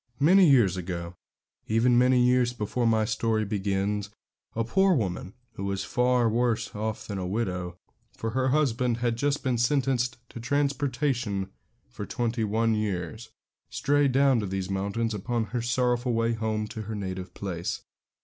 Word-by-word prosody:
Many 180 Hz, +4 st, +6 dB
years 110 Hz, -10 st, +4 dB
ago, 85 Hz, -1 st, -5 dB, 0.5 s
even 115 Hz, +3 st, +3 dB
many 125 Hz, +1 st, +4 dB
years 125 Hz, 0 st, +3 dB
before 120 Hz, +1 st, -1 dB
my 110 Hz, -1 st, +3 dB
story 110 Hz, 0 st, 0 dB
begins, 100 Hz, 0 st, -1 dB, 0.5 s
a 115 Hz, -, +1 dB
poor 190 Hz, +9 st, +3 dB
woman 95 Hz, -, -3 dB, 0.2 s
who 100 Hz, -, -5 dB
was 100 Hz, 0 st, -2 dB
far 125 Hz, -1 st, +2 dB
worse 115 Hz, 0 st, 0 dB
off 110 Hz, +1 st, -4 dB
than 100 Hz, -2 st, -4 dB
a 90 Hz, -, -3 dB
widow, 90 Hz, -4 st, -3 dB, 0.4 s
for 115 Hz, -, -3 dB
her 130 Hz, +2 st, 0 dB
husband 125 Hz, -4 st, +1 dB
had 120 Hz, -1 st, 0 dB
just 145 Hz, +4 st, -1 dB
been 125 Hz, -3 st, 0 dB
sentenced 125 Hz, -1 st, +1 dB
to -, -, -9 dB
transportation 130 Hz, -5 st, -1 dB, 0.4 s
for -, -, -7 dB
twenty 120 Hz, -1 st, -1 dB
one 110 Hz, +2 st, +1 dB
years 105 Hz, +1 st, -3 dB, 0.4 s
strayed 145 Hz, -1 st, +2 dB
down 135 Hz, -1 st, +4 dB
to 105 Hz, -, -2 dB
these 95 Hz, 0 st, -3 dB
mountains 100 Hz, +4 st, -1 dB
upon 115 Hz, +3 st, -1 dB
her 120 Hz, -, 0 dB
sorrowful 120 Hz, 0 st, +1 dB
way 115 Hz, 0 st, +1 dB
home 110 Hz, -1 st, -1 dB
to 115 Hz, -2 st, -6 dB
her 110 Hz, +1 st, -5 dB
native 95 Hz, -2 st, -5 dB
place. 90 Hz, -3 st, -4 dB
115 Hz, 160 wpm, -27 LUFS, 100-125 Hz, 0.5 s, Many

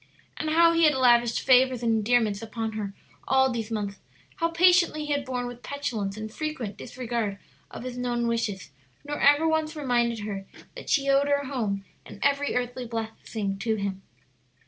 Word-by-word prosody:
And 310 Hz, -, -2 dB
how 335 Hz, +1 st, +5 dB
he 330 Hz, 0 st, +4 dB
had 300 Hz, -2 st, +4 dB
lavished 240 Hz, -2 st, +4 dB
favors 255 Hz, -1 st, +4 dB
and 230 Hz, -, +2 dB
endearments 220 Hz, -2 st, +2 dB
upon 225 Hz, 0 st, -4 dB
her 205 Hz, -2 st, -5 dB, 0.3 s
all 265 Hz, 0 st, +4 dB
these 230 Hz, -2 st, -3 dB
months; 205 Hz, -3 st, -3 dB, 0.4 s
how 330 Hz, -, +1 dB
patiently 340 Hz, -2 st, +4 dB
he 295 Hz, -, -4 dB
had 285 Hz, -1 st, -1 dB
borne 250 Hz, -2 st, -3 dB
with 245 Hz, 0 st, -8 dB
petulance 225 Hz, -9 st, -3 dB
and 215 Hz, 0 st, -6 dB
frequent 285 Hz, -10 st, -4 dB
disregard 235 Hz, -5 st, -3 dB, 0.3 s
of -, -, -8 dB
his 250 Hz, -1 st, -6 dB
known 240 Hz, -1 st, -1 dB
wishes, 215 Hz, -8 st, -2 dB, 0.3 s
nor 295 Hz, 0 st, -4 dB
ever 290 Hz, +3 st, +5 dB
once 315 Hz, 0 st, 0 dB
reminded 240 Hz, -6 st, 0 dB
her 200 Hz, -2 st, -5 dB, 0.3 s
that -, -, -9 dB
she 275 Hz, -2 st, +2 dB
owed 275 Hz, +1 st, +4 dB
her 285 Hz, 0 st, +1 dB
home 215 Hz, -8 st, -2 dB, 0.2 s
and -, -, -12 dB
every 280 Hz, 0 st, +1 dB
earthly 245 Hz, 0 st, -2 dB
blessing 220 Hz, -3 st, -4 dB
to 220 Hz, +2 st, 0 dB
him. 200 Hz, -2 st, -3 dB
245 Hz, 175 wpm, -26 LUFS, 220-285 Hz, 0.4 s, how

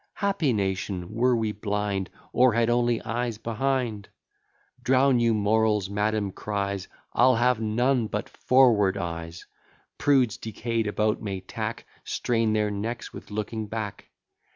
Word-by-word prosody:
Happy 195 Hz, -9 st, +1 dB
nation, 95 Hz, -3 st, -2 dB
were 125 Hz, +2 st, +3 dB
we 110 Hz, -2 st, 0 dB
blind, 105 Hz, -2 st, -2 dB, 0.2 s
Or 125 Hz, -1 st, +5 dB
had 115 Hz, +1 st, +2 dB
only 120 Hz, -1 st, +2 dB
eyes 120 Hz, -1 st, -2 dB
behind! 115 Hz, -2 st, -2 dB, 0.7 s
Drown 130 Hz, 0 st, +4 dB
your 115 Hz, -1 st, +3 dB
morals, 105 Hz, -1 st, +2 dB
madam 105 Hz, 0 st, 0 dB
cries, 100 Hz, -1 st, -3 dB, 0.3 s
I'll 130 Hz, 0 st, +5 dB
have 120 Hz, 0 st, +2 dB
none 120 Hz, +2 st, +1 dB
but -, -, -3 dB
forward 115 Hz, -7 st, +3 dB
eyes; 85 Hz, -2 st, -5 dB, 0.5 s
Prudes 130 Hz, -6 st, +3 dB
decay'd 115 Hz, +1 st, -2 dB
about 105 Hz, +1 st, 0 dB
may 100 Hz, -3 st, -3 dB
tack, 95 Hz, -, -5 dB, 0.2 s
Strain 115 Hz, -2 st, 0 dB
their 105 Hz, -1 st, +1 dB
necks 115 Hz, +4 st, -4 dB
with -, -, -10 dB
looking 110 Hz, +1 st, -4 dB
back. 105 Hz, -2 st, -5 dB
110 Hz, 130 wpm, -26 LUFS, 105-120 Hz, 0.7 s, Or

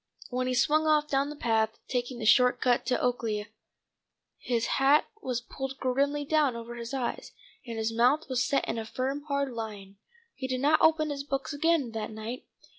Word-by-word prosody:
When 255 Hz, +1 st, -1 dB
he 255 Hz, -, 0 dB
swung 310 Hz, +5 st, +3 dB
off 300 Hz, -1 st, +3 dB
down 275 Hz, +1 st, +1 dB
the 300 Hz, -, -6 dB
path, 225 Hz, -4 st, 0 dB
taking 245 Hz, 0 st, -2 dB
the 225 Hz, -, -5 dB
short 250 Hz, +3 st, +5 dB
cut 245 Hz, -1 st, +1 dB
to 250 Hz, -, +2 dB
Oaklea, 225 Hz, -4 st, -1 dB, 0.9 s
his 235 Hz, -2 st, -1 dB, 0.2 s
hat 280 Hz, +3 st, +5 dB, 0.2 s
was 250 Hz, -, -2 dB
pulled 270 Hz, +2 st, -6 dB
grimly 280 Hz, +3 st, 0 dB
down 295 Hz, -4 st, +2 dB
over 235 Hz, 0 st, -7 dB
his 235 Hz, -1 st, -7 dB
eyes, 255 Hz, -3 st, -3 dB, 0.3 s
and 230 Hz, -1 st, -5 dB
his 220 Hz, 0 st, -1 dB
mouth 250 Hz, +7 st, +3 dB
was 255 Hz, -1 st, +1 dB
set 275 Hz, +2 st, 0 dB
in 225 Hz, -, -2 dB
a 220 Hz, -, -5 dB
firm 260 Hz, +5 st, -2 dB
hard 280 Hz, -2 st, 0 dB
line. 205 Hz, -4 st, -7 dB, 0.4 s
He 260 Hz, -, -5 dB
did 255 Hz, -1 st, -2 dB
not 300 Hz, +2 st, +4 dB
open 310 Hz, -1 st, +4 dB
his 280 Hz, -1 st, -4 dB
books 275 Hz, 0 st, -3 dB
again 300 Hz, -4 st, +1 dB
that 220 Hz, -1 st, -4 dB
night. 220 Hz, +3 st, -7 dB
255 Hz, 190 wpm, -28 LUFS, 230-280 Hz, 0.9 s, short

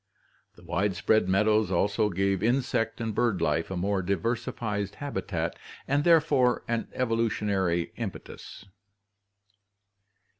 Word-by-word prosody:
The -, -, -18 dB
widespread 100 Hz, +2 st, +1 dB
mead 100 Hz, +3 st, +3 dB
ows 110 Hz, -3 st, +3 dB
also 100 Hz, +3 st, +1 dB
gave 95 Hz, 0 st, 0 dB
insect 120 Hz, -1 st, 0 dB
and 115 Hz, -2 st, -2 dB
bird 110 Hz, -2 st, +1 dB
life 75 Hz, +2 st, 0 dB
a 95 Hz, -, -4 dB
more 95 Hz, +2 st, 0 dB
diversified 100 Hz, +1 st, -2 dB
habitat 90 Hz, -, -3 dB, 0.3 s
and 140 Hz, +2 st, +1 dB
therefore 150 Hz, -7 st, +3 dB
an 115 Hz, -1 st, -1 dB
evolutionary 105 Hz, -7 st, 0 dB
impetus. -, -, -8 dB
105 Hz, 110 wpm, -27 LUFS, 95-115 Hz, 0.3 s, mead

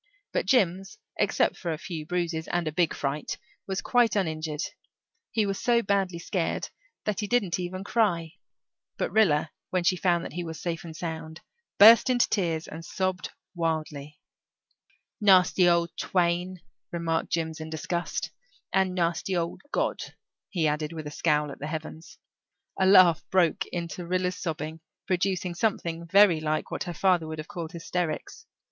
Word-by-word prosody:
But -, -, -1 dB
Jims, 195 Hz, -, +2 dB, 0.2 s
except -, -, +2 dB
for 170 Hz, -, -3 dB
a 160 Hz, -, -2 dB
few 160 Hz, -2 st, -6 dB
bruises, 170 Hz, -2 st, -2 dB
and 175 Hz, -2 st, -1 dB
a -, -, 0 dB
big 165 Hz, +1 st, +1 dB
fright, 145 Hz, +1 st, -3 dB, 0.3 s
was 190 Hz, 0 st, -2 dB
quite 240 Hz, -4 st, +3 dB
uninjured. 155 Hz, -4 st, -1 dB, 0.7 s
He 220 Hz, -2 st, +1 dB
was 195 Hz, -1 st, -2 dB
so 235 Hz, -1 st, +3 dB
badly 195 Hz, -3 st, 0 dB
scared 170 Hz, 0 st, -2 dB, 0.4 s
that 210 Hz, -3 st, -1 dB
he 210 Hz, -, -2 dB
didn't 200 Hz, -7 st, +1 dB
even 185 Hz, +1 st, -4 dB
cry, 185 Hz, -7 st, +1 dB, 0.7 s
but -, -, -1 dB
Rilla, 160 Hz, -8 st, +3 dB, 0.2 s
when 185 Hz, -1 st, 0 dB
she 185 Hz, -, +3 dB
found 175 Hz, -2 st, +1 dB
that -, -, -7 dB
he 175 Hz, -, -3 dB
was 160 Hz, -2 st, -6 dB
safe 170 Hz, -1 st, -3 dB
and 165 Hz, -2 st, -9 dB
sound, 160 Hz, -1 st, -6 dB, 0.4 s
burst 225 Hz, +5 st, +9 dB
into 245 Hz, -1 st, +3 dB
tears 170 Hz, -5 st, -1 dB
and 160 Hz, +2 st, -8 dB
sobbed 185 Hz, +1 st, -2 dB, 0.2 s
wildly. 155 Hz, -3 st, -3 dB, 1.0 s
"Nasty 185 Hz, -2 st, +5 dB
old 170 Hz, -1 st, +1 dB
twain," 180 Hz, 0 st, 0 dB, 0.3 s
remarked 165 Hz, -1 st, -1 dB
Jims 160 Hz, -1 st, -2 dB
in 155 Hz, 0 st, -6 dB
disgust. 170 Hz, +2 st, -3 dB, 0.4 s
"And 190 Hz, -1 st, +2 dB
nasty 175 Hz, +2 st, 0 dB
old 170 Hz, 0 st, -3 dB
God," -, -, 0 dB, 0.5 s
he 170 Hz, -5 st, +1 dB
added, 150 Hz, +1 st, -1 dB
with 155 Hz, -2 st, -6 dB
a 150 Hz, -, -5 dB
scowl 150 Hz, -1 st, +1 dB
at -, -, -10 dB
the 145 Hz, -, -4 dB
heavens. 160 Hz, +1 st, -7 dB, 0.6 s
A 190 Hz, -, +4 dB
laugh 185 Hz, -4 st, +7 dB
broke 185 Hz, +1 st, +2 dB
into 170 Hz, 0 st, -5 dB
Rilla's 180 Hz, 0 st, 0 dB
sobbing, 160 Hz, -2 st, -4 dB, 0.3 s
producing 185 Hz, -1 st, 0 dB
something 170 Hz, -4 st, -1 dB
very 195 Hz, -2 st, +6 dB
like 155 Hz, 0 st, -1 dB
what -, -, -3 dB
her 175 Hz, -, -4 dB
father 180 Hz, -2 st, +2 dB
would 155 Hz, 0 st, -5 dB
have 155 Hz, 0 st, -6 dB
called 165 Hz, -1 st, -6 dB
hysterics. 170 Hz, -1 st, -4 dB
170 Hz, 160 wpm, -27 LUFS, 160-185 Hz, 1.0 s, burst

